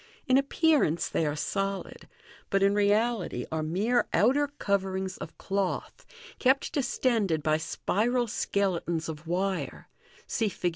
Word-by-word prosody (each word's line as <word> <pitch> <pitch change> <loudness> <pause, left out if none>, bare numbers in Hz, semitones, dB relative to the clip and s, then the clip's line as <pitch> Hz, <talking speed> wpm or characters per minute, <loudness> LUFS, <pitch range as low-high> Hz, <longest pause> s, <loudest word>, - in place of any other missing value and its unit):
In 255 - +3
appearance 275 - +2
they 160 - 0
are 145 - -1
solid, 195 +5 -3 0.4
but 195 0 +2
in 200 0 +4
reality 205 - +1
are 160 0 -1
mere 205 +10 +1
outer 290 +3 +3
coverings 190 -7 -2
of - - -8
cloth, 195 -1 -3 0.3
kept 265 +1 +2
distended 225 - +1
by 155 +1 +3
spiral 230 +9 0
skeletons 175 -6 -1
of 160 0 -7
wire 190 +2 -2 0.4
{see 220 -2 0
Fig. 180 - -1
195 Hz, 130 wpm, -28 LUFS, 170-240 Hz, 0.4 s, in